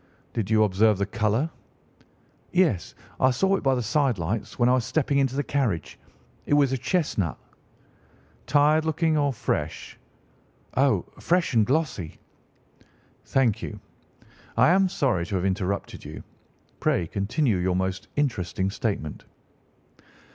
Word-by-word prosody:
"Did 105 -4 -2
you 110 -1 +4
observe 105 +1 +3
the 100 - 0
colour?" 115 +7 0 1.0
"Yes, 170 - +1 0.2
I 130 - +5
saw 190 +10 +2
it - - -2
by 135 -1 +2
the 125 - -1
side 130 0 +1
lights 95 +6 -3
when 120 - +3
I 125 - +4
was 130 -2 +2
stepping 140 +2 +1
into 135 -1 +1
the 145 - 0
carriage. 115 - -2 0.5
It 145 - +3
was 140 -3 +4
a 130 - 0
chestnut." 115 - -1 1.1
"Tired 150 +2 +4
looking 160 0 +1
or 145 -2 +2
fresh?" 105 - -3 0.8
"Oh, 135 +1 +2
fresh 175 -3 +1
and 110 -3 +3
glossy." 135 - -1 1.1
"Thank 125 -6 +1
you. - - -6 0.8
I - - +6
am 190 +1 +4
sorry 130 - 0
to 100 - -3
have 90 0 0
interrupted 95 0 -2
you. - - -8 0.6
Pray 85 - +1
continue 105 - 0
your 90 0 0
most 95 0 -2
interesting 95 -9 -1
statement." 100 -9 -3
120 Hz, 140 wpm, -25 LUFS, 95-145 Hz, 1.1 s, I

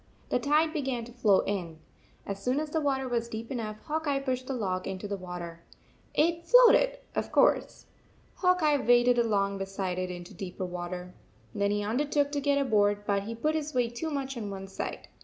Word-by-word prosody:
The - - +1
tide 305 +4 +2
began 260 -6 -2
to 240 - -12
flow 215 -5 +3
in. 175 -5 -3 0.5
As 200 0 -5
soon 255 +5 +1
as 305 -1 -4
the 320 - 0
water 265 -2 0
was 235 -1 -1
deep 225 +3 -6
enough 220 -4 -4
Hawk 315 0 -3
Eye 280 -1 +2
pushed 255 -2 -3
the 270 - -2
log 185 -5 -2
into 195 +1 -4
the 200 - -2
water. 175 -3 -7 0.5
It 335 +2 +2
floated, - - +6 0.2
of - - -2
course. - - +2 0.5
Hawk 365 -2 +3
Eye 295 -2 +4
waded 245 -1 +4
along 200 -4 +1
beside 195 -2 -3
it 185 0 -2
into 175 -1 -8
deeper 185 -1 -5
water. 180 0 -6 0.4
Then 200 -1 +1
he 205 0 0
undertook 285 +6 0
to 290 -1 -1
get 285 0 +2
aboard, 205 -6 +2
but 200 -1 0
he 230 +2 -5
put 305 +7 0
his 305 -2 -3
weight 240 -2 +1
too 320 +6 -3
much 275 -2 -3
on 215 -4 -4
one 195 -1 -6
side. 190 - -5
235 Hz, 200 wpm, -29 LUFS, 195-285 Hz, 0.5 s, floated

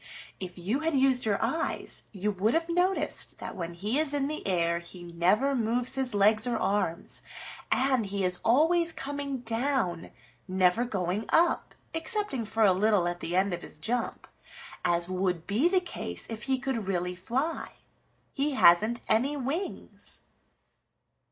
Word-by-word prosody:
If 185 -1 -7
you 200 +10 -1
had 320 -1 0
used 260 -3 +3
your 200 -2 +2
eyes 320 +9 -1
you 205 +1 -1
would 205 +6 +1
have 330 0 +1
noticed 355 +3 0
that - - -7
when 170 -2 -5
he 210 - -1
is 300 -2 +3
in 280 -1 0
the 305 -6 -5
air 170 -2 +1
he 175 +1 -11
never 180 +11 +2
moves 240 +1 0
his 265 -4 0
legs 215 +3 +4
or 240 - 0
arms, 195 -3 -1 0.5
and 260 -4 +2
he 200 0 -2
is 180 -1 0
always 330 +7 +4
coming 280 -2 -4
down, 230 - -1 0.4
never 185 +5 +2
going 195 -1 -2
up, 345 +1 +2 0.2
excepting 325 - -1
for 220 +1 0
a 195 -3 +6
little 200 -2 +2
at 175 0 -3
the 175 +1 -3
end 190 0 +2
of 175 - -4
his - - -10
jump, 230 +9 -3 0.6
as 170 0 +1
would 180 -2 -1
be 225 +11 +2
the 375 0 +3
case 360 - -3
if 225 0 -5
he 265 - +3
could 255 -6 -3
really 180 -1 -1
fly. 255 - -3 0.6
He 285 +1 0
hasn't 215 +1 +5
any 275 +6 +2
wings." 285 +9 -5
225 Hz, 160 wpm, -28 LUFS, 185-275 Hz, 0.6 s, a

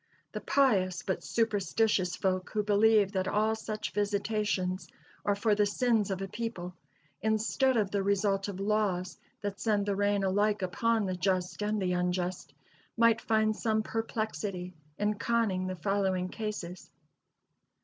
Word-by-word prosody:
The - - -5
pious 195 -10 +2
but 190 - -2
superstitious 210 -4 +1
folk 185 -1 -1
who 210 -1 -1
believe 210 -1 +4
that 190 -2 -1
all 215 +1 +2
such 215 -4 -4
visitations 205 -1 -1 0.4
are 205 - +1
for 210 +1 +2
the 205 0 +3
sins 225 -1 +1
of 195 0 -2
a - - -3
people, 190 -4 -5 0.5
instead 225 +4 +2
of 205 -3 +1
the 200 - 0
result 195 0 +1
of 195 -2 -5
laws 195 -3 0 0.2
that 205 -1 -4
send 210 -3 +1
the 200 -1 0
rain 205 0 +1
alike 205 +1 +1
upon 225 +4 +1
the 185 -1 -2
just 180 0 -1
and 210 +1 0
the 180 -2 0
unjust, 180 0 -2 0.5
might 230 -1 +4
find 220 -1 +2
some 220 -1 0
perplexity 215 -5 -3 0.2
in 210 0 0
conning 215 -6 +1
the 185 - -3
following 190 0 0
cases. 205 -5 -5
205 Hz, 150 wpm, -30 LUFS, 185-215 Hz, 0.5 s, believe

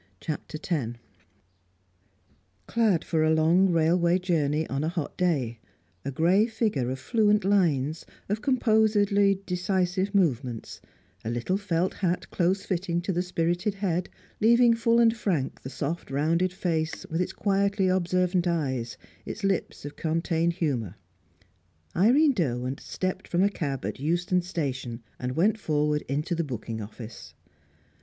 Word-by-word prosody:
CHAPTER 155 0 -5
X 120 -8 -1 1.7
Clad 215 - +2
for 160 -2 0
a 155 - +3
long 165 +4 +4
railway 170 +1 +3
journey 160 -4 0
on 135 +2 -2
a 160 - 0
hot 165 -3 -4
day; 135 -11 0 0.4
a 140 - -3
grey 175 - +3
figure 215 - -1
of 130 - -3
fluent 210 - +2
lines, 160 -7 +2 0.2
of 210 +2 -2
composedly 210 -5 +3
decisive 185 +1 0
movements; 130 - 0 0.4
a 110 - -3
little 120 +10 -1
felt 185 -3 0
hat 180 -2 -2
close 185 +2 +1
fitting 175 -2 -1
to 185 +2 -2
the 175 - +1
spirited 175 +2 -1
head, 180 -3 -1 0.3
leaving 235 +2 +5
full 230 0 +2
and 230 -1 +5
frank 175 - -2
the 130 - -7
soft 155 +5 -4
rounded 165 +6 +1
face, 165 -3 -2
with 165 +2 0
its 180 - -1
quietly 200 -1 +1
observant 180 0 +1
eyes, 130 -9 -1 0.3
its 220 - -7
lips 195 -6 -1
of 145 - -7
contained 165 +1 0
humour 130 - -2 1.0
Irene 270 - +5
Derwent 130 - -1
stepped 185 0 -4
from 175 +2 +1
a 200 - +4
cab 140 - -3
at 105 - -4
Euston 175 +5 +1
Station 130 -9 -4 0.2
and 125 0 -3
went 215 +6 +2
forward 150 -4 +1
into 150 +6 -1
the 170 0 0
booking 115 -5 -5
office. 110 +2 -10
175 Hz, 140 wpm, -27 LUFS, 145-195 Hz, 1.7 s, leaving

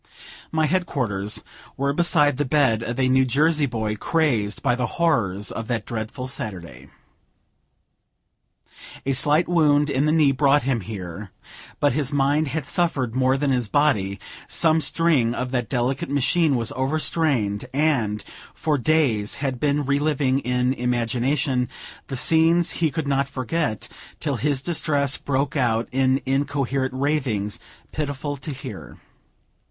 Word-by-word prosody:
My 160 -1 +1
headquarters 130 - -1 0.3
were 140 +1 0
beside 150 -4 +3
the 145 - +1
bed 130 -5 +2
of 120 +2 -4
a 130 - +3
New 130 +1 +4
Jersey 150 +3 +2
boy, 110 -3 -2
crazed 115 -6 0
by 130 -3 +2
the 125 -1 -1
horrors 105 - +1
of 115 -1 -5
that 115 -4 -2
dreadful 115 +3 -5
Saturday. 85 - -5 2.2
A 135 - +1
slight 150 +5 +3
wound 150 -4 +3
in 135 +1 +1
the 155 - +2
knee 155 -3 +4
brought 140 +1 +3
him 125 -3 0
there; 95 -1 -7 0.5
but 145 -3 +2
his 145 0 -1
mind 145 +2 +1
had 145 +1 -3
suffered 140 -7 0
more 130 +1 +2
than 140 0 0
his 125 -3 0
body; 105 -8 +1 0.3
some 160 -1 +2
string 140 -6 +2
of 125 +1 -3
that 125 -3 -2
delicate 130 +1 -1
machine 145 +2 +2
was 115 -2 -1
over 135 +4 -1
strained, 130 -11 +1
and, 125 -9 0 0.3
for 150 -3 0
days, 125 -8 +1
he - - -11
had 130 -2 -2
been 145 +1 0
reliving, 140 -1 +1
in 125 0 0
imagination, 125 +2 0 0.4
the 135 - -5
scenes 165 +4 +3
he 165 -2 0
could 155 0 -4
not 140 0 0
forget, 130 -2 -2 0.3
till - - -2
his 140 -2 0
distress 145 -5 +1
broke 140 +1 -2
out 115 -4 +1
in 130 +1 +2
incoherent 135 -1 -1
ravings, 130 -8 -1 0.3
pitiful 145 -1 -3
to 140 +3 -8
hear. 130 -7 -8
135 Hz, 145 wpm, -23 LUFS, 120-150 Hz, 2.2 s, New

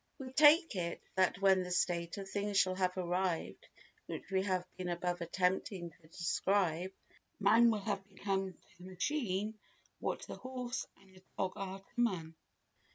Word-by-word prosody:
We 260 -2 -7
take 305 - +6
it 170 -2 -2
that 185 -1 +2
when 190 -1 +6
the 180 - -4
state 175 -1 0
of 195 -1 -5
things 200 0 -1
shall 185 -1 +4
have 185 0 0
arrived 180 -1 -1 0.4
which - - -6
we 190 -1 +3
have 185 -2 0
been 180 -1 -4
above 175 0 -1
attempting 180 0 0
to 155 0 -22
describe, 180 +1 0 0.5
man 225 +4 +6
will 215 -2 +1
have 200 -1 -3
become 195 -1 -2
to 180 - -27
the - - -12
machine 210 -1 -1 0.4
what - - -2
the - - -7
horse 255 -1 -4
and 195 -1 -21
the 185 - -16 0.2
dog 185 -1 0
are 195 0 -5
to - - -30 0.2
man. 175 -9 0
190 Hz, 165 wpm, -35 LUFS, 180-205 Hz, 0.5 s, take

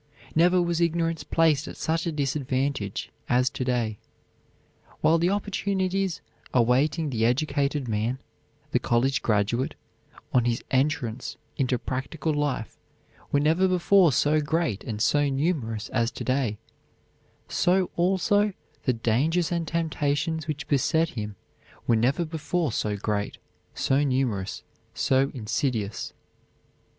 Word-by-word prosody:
Never 175 +3 +4
was 170 -1 0
ignorance 165 -1 +1
placed 160 -3 +2
at - - -8
such 165 +1 -1
a - - 0
disadvantage 135 -6 -2 0.2
as 125 +1 +3
to - - -3
day. 120 -4 -1 1.0
While 165 +1 +4
the 170 +2 +2
opportunities 195 -2 -1 0.3
awaiting 135 +6 +2
the 110 -3 0
educated 140 +2 +1
man, 110 +3 -1 0.5
the - - +3
college 120 +2 +1
graduate, 110 +4 0 0.6
on 125 -2 +4
his 120 -1 0
entrance 130 -4 0 0.2
into 130 -2 +1
practical 135 +6 -3
life 145 -6 -2 0.5
were 145 - +3
never 160 +6 +3
before 185 -1 +4
so 150 +3 +3
great 155 - -1
and 110 -4 -4
so 145 +5 +3
numerous 135 -7 -1
as 115 -2 +1
to - - -5
day, 130 -5 0 0.9
so 185 +1 +2
also 195 +3 +2 0.3
the 130 - +3
dangers 140 +10 +1
and 170 -2 -1
temptations 160 -1 -1
which 150 -2 -4
beset 160 +3 +2
him 105 -8 -5 0.5
were 115 - +3
never 130 +9 +2
before 160 -1 -1
so 105 -1 -1
great, 100 0 -2 0.4
so 135 +2 +2
numerous, 125 -8 -1 0.3
so 135 +1 +2
insidious. 110 -2 -2
140 Hz, 125 wpm, -26 LUFS, 120-165 Hz, 1.0 s, Never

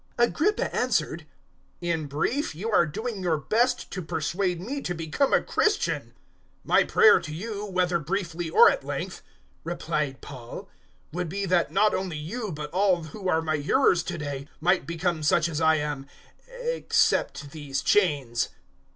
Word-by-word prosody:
026:028 240 - +5
Agrippa 415 +7 0
answered, - - 0 0.5
"In 170 -3 -2
brief, 155 - -1
you 215 +8 -3
are 170 -5 +4
doing 215 +5 -4
your 170 -3 +1
best 240 - 0
to 185 - -4
persuade 175 +3 -1
me 265 +10 -4
to 175 - -3
become 165 - 0
a - - +4
Christian." 425 - +1
026:029 - - -23 0.5
"My - - +4
prayer 455 -1 +6
to 155 - -8
God, 210 -1 -5
whether 180 -1 +2
briefly 170 0 -3
or - - +7
at - - -4
length," 145 +7 -5 0.4
replied 150 -5 -2
Paul, 125 -4 -9 0.4
"would 180 -1 -2
be 200 +3 -2
that 175 -4 +2
not 205 +4 +3
only 185 -4 -2
you 200 +8 -4
but 150 -1 -6
all 185 -2 +2
who 185 +5 -5
are 160 -2 +2
my 155 -1 0
hearers 175 - +3
to 175 +1 -5
day, 145 -2 -5
might 180 +3 +2
become 170 0 -1
such 155 +2 +3
as 160 -1 -3
I 160 0 +5
am 150 -2 -3 0.4
except 485 - 0
these 145 -3 -4
chains." 145 - +2
170 Hz, 165 wpm, -26 LUFS, 150-200 Hz, 0.5 s, or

